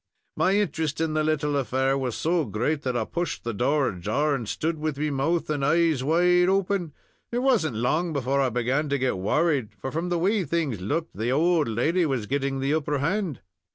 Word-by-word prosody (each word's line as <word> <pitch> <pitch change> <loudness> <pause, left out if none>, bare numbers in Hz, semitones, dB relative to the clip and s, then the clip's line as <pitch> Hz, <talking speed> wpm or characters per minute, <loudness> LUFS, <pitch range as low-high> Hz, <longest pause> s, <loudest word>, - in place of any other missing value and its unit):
My 185 - +2
interest 160 -7 -1
in 160 -1 0
the 155 0 +1
little 150 -1 0
affair 135 0 +1
was 130 -4 -2
so 165 0 +1
great, 145 +5 -1
that 125 -3 -1
I 110 - -1
pushed 175 +7 -3
the 115 - -3
door 135 +6 +1
ajar, 110 - -1
and 120 -6 -3
stood 160 0 -2
with 155 -2 -2
me 150 +1 -1
mouth 155 +5 0
and 145 -2 -1
eyes 160 -2 +2
wide 180 +4 +3
open. 190 -4 0 0.4
It 240 +1 -1
wasn't 210 - +2
long 155 +10 0
before 140 -1 0
I 130 - +2
began 125 +6 0
to 140 - +1
get 130 -8 -1
worried, 130 - 0
for, 130 +7 -6
from 165 +3 -2
the 175 - +1
way 195 +4 +1
things 150 - -2
looked, 160 - -2
the 115 +3 -1
owld 160 +2 +2
lady 155 +10 +1
was 130 -6 -1
getting 135 +1 -1
the 140 +2 +1
upper 150 -2 0
hand. 165 - -1
150 Hz, 205 wpm, -25 LUFS, 130-165 Hz, 0.4 s, wide